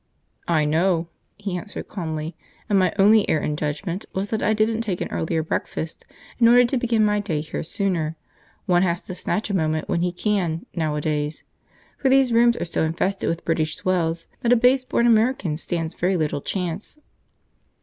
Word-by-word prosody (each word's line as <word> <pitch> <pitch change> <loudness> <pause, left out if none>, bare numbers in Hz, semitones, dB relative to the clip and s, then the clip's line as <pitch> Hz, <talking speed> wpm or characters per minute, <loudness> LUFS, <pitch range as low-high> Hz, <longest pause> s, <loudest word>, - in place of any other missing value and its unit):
"I 155 -3 +2
know," 165 +2 +1 0.3
he 200 -3 -4
answered 205 +4 -6
calmly, 160 -3 -4 0.3
"and 205 -3 +3
my 185 -2 +3
only 210 +1 +5
error 155 - +1
in 150 - -1
judgment 165 +6 -3
was 195 +2 -3
that 220 - 0
I - - +2
didn't 220 +1 +1
take 200 -6 -2
an - - -4
earlier 160 0 -1
breakfast, 160 0 -4 0.3
in 230 - +6
order 245 +1 +7
to 260 +3 0
begin 230 -3 +2
my 210 0 +2
day 195 -7 -2
here 155 - -5
sooner. 165 -3 -1 0.5
One 175 -1 +3
has 175 -1 +1
to - - -7
snatch 205 +3 -2
a - - 0
moment 155 -2 0
when 170 - 0
he 180 0 +1
can, 180 -3 -1
nowadays; 150 -1 -2 0.6
for 270 - +2
these 265 -2 +4
rooms 235 +1 +4
are - - -2
so 165 - -1
infested 175 +5 -1
with 165 0 -3
British 160 -1 0
swells 170 -3 -1
that 235 - +1
a - - +7
base 255 +2 +3
born 235 - +1
American 225 -7 +3
stands 165 0 -3
very 180 +1 0
little 150 -3 -1
chance!" 180 - -4
180 Hz, 185 wpm, -23 LUFS, 160-215 Hz, 0.6 s, order